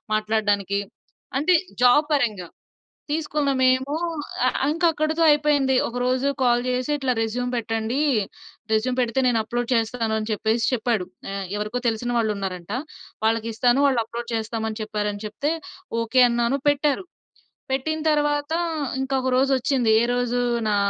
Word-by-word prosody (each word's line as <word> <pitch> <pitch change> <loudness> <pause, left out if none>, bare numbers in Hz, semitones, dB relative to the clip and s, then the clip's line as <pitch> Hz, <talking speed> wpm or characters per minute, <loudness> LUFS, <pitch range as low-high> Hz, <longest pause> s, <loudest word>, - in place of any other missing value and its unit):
మాట్లాడడానికి 205 -2 0 0.6
అంటే 360 +5 +3 0.3
జాబ్ 275 +5 +6
పరంగా. 215 -10 0 0.6
తీసుకున్న 300 -2 0
మేము 260 +3 +2 0.5
ఆహ్, 255 - +1 0.2
ఇంకా 345 +2 0
అక్కడితో 310 +2 -1
అయిపోయింది. 290 -3 +2
ఒకరోజు 250 +2 0
కాల్ 240 -1 +3
జేసి 250 +3 -1
ఇట్లా 265 -3 0
రెస్యూమ్ 245 +3 -2
పెట్టండి, 225 +2 -2 0.7
రెస్యూమ్ 230 +4 +1
పెడితే 245 +1 +1
నేను 240 -2 +2
అప్‌లోడ్ 240 +1 -3
చేస్తాను 225 -1 0
అని 215 +1 -5
చెప్పేసి 220 +2 0
చెప్పాడు. 225 -5 0 0.3
ఆహ్, 195 -1 -4
ఎవరికో 215 +4 -3
తెలిసిన 240 +2 -1
వాళ్ళున్నారంట. 195 -5 -2 0.5
వాళ్ళకిస్తాను 230 +3 +2
వాళ్ళు 255 -4 +2
అప్‌లోడ్ 235 +1 -6
చేస్తాం 220 0 -3
అని 220 +1 -6
చెప్పారు 210 -1 -2
అని 205 +1 -8
చెప్తే. 280 +9 -2 0.5
ఓకే 240 +3 +3
అన్నాను, 235 +3 +1
పెట్టారు. 290 +5 +1 0.7
పెట్టిన 315 +4 -1
తరువాత 295 0 0 0.5
ఇంక 265 0 -4
ఒక 260 - 0
రోజొచ్చింది. 265 -2 +2
ఏరోజు 245 0 0 0.3
నా 205 - +2
245 Hz, 130 wpm, -23 LUFS, 220-270 Hz, 0.7 s, జాబ్